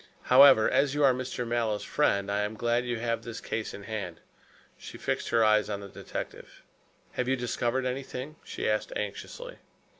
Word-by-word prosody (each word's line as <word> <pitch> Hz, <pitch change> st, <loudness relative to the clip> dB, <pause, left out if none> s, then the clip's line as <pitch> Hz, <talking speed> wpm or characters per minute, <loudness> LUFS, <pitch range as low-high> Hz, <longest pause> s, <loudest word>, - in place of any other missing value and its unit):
However, 130 Hz, -5 st, +8 dB
as 140 Hz, 0 st, +2 dB
you 145 Hz, -, +2 dB
are 135 Hz, -2 st, +6 dB
Mr. 125 Hz, -1 st, -4 dB
Mallow's 115 Hz, -3 st, 0 dB
friend, 100 Hz, -9 st, +1 dB
I 100 Hz, -, +1 dB
am 105 Hz, +1 st, -2 dB
glad 120 Hz, +2 st, 0 dB
you 120 Hz, -1 st, -1 dB
have 115 Hz, 0 st, -1 dB
this 115 Hz, -1 st, -7 dB
case 110 Hz, -1 st, -3 dB
in 100 Hz, -, -9 dB
hand," 100 Hz, -5 st, -5 dB, 0.6 s
she -, -, -10 dB
fixed -, -, -2 dB
her 115 Hz, -1 st, +4 dB
eyes 110 Hz, -1 st, +3 dB
on 100 Hz, -1 st, -2 dB
the 100 Hz, -, -9 dB
detective. -, -, -8 dB, 0.5 s
"Have 125 Hz, -, -2 dB
you 130 Hz, -, +2 dB
discovered 125 Hz, +1 st, -1 dB
anything?" 130 Hz, +2 st, -4 dB
she -, -, -4 dB
asked -, -, 0 dB
anxiously. -, -, -6 dB
120 Hz, 180 wpm, -29 LUFS, 110-130 Hz, 0.6 s, However